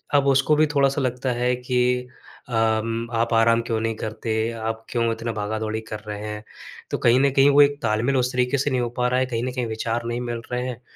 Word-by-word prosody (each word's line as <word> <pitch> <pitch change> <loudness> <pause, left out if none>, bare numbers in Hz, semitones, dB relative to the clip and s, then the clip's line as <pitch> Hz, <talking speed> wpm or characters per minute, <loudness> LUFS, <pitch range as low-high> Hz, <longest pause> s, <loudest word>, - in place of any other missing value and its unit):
अब 140 -1 +4
उसको 135 +2 +4
भी 155 +1 +4
थोड़ा-सा 140 0 +3
लगता 125 0 -1
है 125 +1 +1
कि 125 0 0 0.4
अम, 115 0 0
"आप 115 0 0
आराम 115 +1 +4
क्यों 115 -2 0
नहीं 115 0 -1
करते? 110 +1 -4 0.2
आप 115 0 -4
क्यों 115 -1 0
इतना 115 +1 -4
भागा-दौड़ी 110 +1 -3
कर 110 - -5
रहे 105 -1 -5
हैं?" 105 0 -6 0.5
तो - - 0
कहीं 120 +2 +4
न 140 - +3
कहीं 135 +1 +5
वो 145 +1 +6
एक 145 0 +3
तालमेल 115 +5 +1
उस 125 0 +1
तरीके 125 +2 +1
से 140 +2 0
नहीं 130 -1 +1
हो 120 - -1
पा 125 0 +2
रहा 125 +1 +1
है। 130 - +2
कहीं 120 -2 -3
न 130 - -2
कहीं 125 -2 -2
विचार 115 +1 -2
नहीं 120 +1 -2
मिल 120 -1 -4
रहे 125 0 -1
हैं, 125 -1 -6
120 Hz, 235 wpm, -23 LUFS, 115-130 Hz, 0.5 s, वो